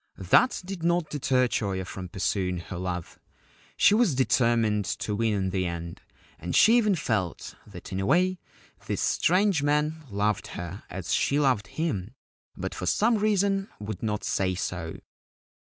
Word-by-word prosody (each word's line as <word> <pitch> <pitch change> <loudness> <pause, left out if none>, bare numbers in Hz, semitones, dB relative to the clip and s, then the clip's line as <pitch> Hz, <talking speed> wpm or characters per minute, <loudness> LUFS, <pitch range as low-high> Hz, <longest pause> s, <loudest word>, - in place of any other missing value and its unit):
That 100 - +3
did 190 -2 -6
not 170 -1 +1
deter 130 -3 +2
Choyo 95 -5 -2
from 90 0 -7
pursuing 90 0 -1
her 85 +2 -7
love. 90 -2 -5 0.6
She - - +6
was 210 - +3
determined 115 -5 +2
to 105 - -3
win 110 0 +1
in 95 -1 -1
the 95 -1 0
end, 85 0 -6 0.4
and 85 +3 -4
she 225 +2 +6
even 210 -4 +3
felt 110 - -2
that 95 -4 -11
in 95 - -2
a 95 - -1
way 180 +4 +2 0.5
this - - -2
strange 185 -2 +2
man 150 +2 0
loved 105 +1 -1
her 90 +2 -6
as 90 -3 -4
she 140 - +2
loved 130 -8 +2
him, 125 - -3 0.4
but 95 +1 -4
for 90 - -5
some 220 - +3
reason 200 -1 +1
would 105 -2 -6
not 105 -2 -2
say 95 -1 0
so. 85 -3 -4
110 Hz, 160 wpm, -27 LUFS, -, 0.6 s, She